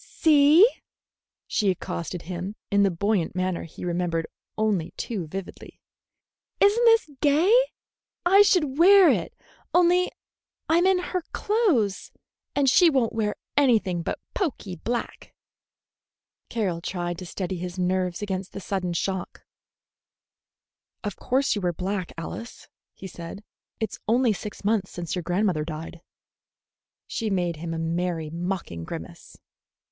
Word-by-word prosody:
"See," 310 +5 +6 0.8
she 205 - +1
accosted 175 -1 -4
him, 180 +4 -5 0.2
in 200 0 +4
the 200 - +4
buoyant 190 0 0
manner 185 -1 -1
he 165 - -9
remembered 170 -2 -1 0.3
only 210 -7 0
too 195 -9 -4
vividly, 190 +3 -8 0.8
"is 405 +1 +5
n't 475 +1 +2
this 455 -9 +5
gay? 310 +8 +4 0.7
I 390 +3 +7
should 310 -8 +3
wear 385 +1 +8
it, - - -2 0.4
only 360 +1 +4 0.6
I'm 340 +3 +4
in 380 -1 +4
her 360 0 -2
clothes, 360 - +1 0.4
and 285 -1 +2
she 340 +6 +6
won't 260 -6 +1
wear 215 -2 -1 0.2
anything 225 -11 +3
but - - -3
poky 255 - -3
black." 235 +8 -5 1.1
Carroll 190 -8 -1
tried 175 -1 -3
to 180 - -7
steady 185 +1 -4
his 180 +1 -6
nerves 185 0 0
against 190 -2 -4
the - - -5
sudden 185 -2 -2
shock. 190 +2 -3 1.6
"Of 205 -3 -3
course 270 +2 +1
you 205 - -2
wear 175 -1 0
black, 185 +1 -3
Alice," 230 +8 -7 0.3
he - - -11
said; 175 +2 -8 0.4
"it 220 -3 -2
is - - -9
only 235 0 +3
six 200 +1 -8
months 210 -3 +1
since 175 -1 -5
your 180 - -2
grandmother 175 -2 0
died." 165 +1 -7 1.0
She 225 -2 -3
made 175 -4 -1
him 165 +1 -5
a 165 - -3
merry, 165 -1 -2
mocking 170 - -4
grimace. - - -9
195 Hz, 135 wpm, -25 LUFS, 175-270 Hz, 1.6 s, wear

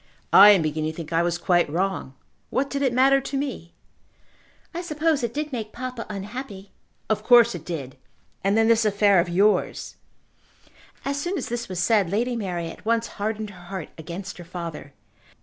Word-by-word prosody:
"I 200 +2 +10
am 195 -5 +6
beginning 155 0 -1
to - - -17
think 165 -1 -6
I 165 - +3
was 175 0 0
quite 175 -2 +2
wrong. 180 -4 -2 0.3
What 275 +1 -1
did 280 - -2
it 265 -3 +2
matter 270 +2 +4
to 275 +1 -4
me?" 265 - -5 1.0
"I 345 - -3
suppose 315 -3 0
it 235 -2 -2
did 300 +3 -4
make 220 -3 -4
papa 255 -1 -6
unhappy." 205 0 -7 0.4
"Of 215 -1 0
course 240 -1 +6
it 175 -4 -7
did; 145 -7 -6 0.5
and 200 +2 +2
then 225 0 +4
this 230 0 +4
affair 200 -2 +4
of 175 - 0
yours." 200 +4 +1 1.1
As 280 +1 -1
soon 355 +5 -2
as - - -4
this 240 -1 -4
was 185 - -5
said 195 0 +2
Lady 240 +6 0
Mary 180 -6 -3
at 165 - -10
once 230 +1 +1 0.2
hardened 215 0 -2
her 180 -2 -14
heart 185 -3 -6
against 175 +4 -7
her - - -8
father. 170 -4 -7
205 Hz, 185 wpm, -24 LUFS, 175-245 Hz, 1.1 s, I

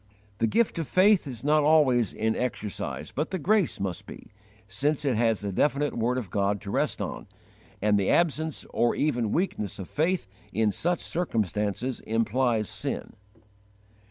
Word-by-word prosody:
The 115 - +3
gift 225 - +1
of 160 - -3
faith 185 - +4
is 125 -3 -7
not 150 +1 +4
always 140 - +4
in 110 0 -1
exercise, 110 -4 -3
but 150 +3 -2
the 190 - -2
grace 195 +1 +2
must 95 -3 -4
be, - - -11 0.4
since 145 +8 -1
it 130 -4 +2
has 115 -2 +2
the 100 -1 -3
definite 145 +7 +1
word 120 +2 0
of 110 -8 -5
God 100 0 +1
to 100 - -6
rest - - 0
on, - - -6 0.6
and 105 -1 +4
the 95 - 0
absence 160 -2 +1
or 120 0 +2
even 120 -8 0
weakness 160 - -1
of 95 - -7
faith 170 +4 0 0.3
in 110 +1 +2
such 175 - 0
circumstances 110 - -1
implies 115 0 0
sin. - - -4
125 Hz, 160 wpm, -27 LUFS, 105-155 Hz, 0.6 s, faith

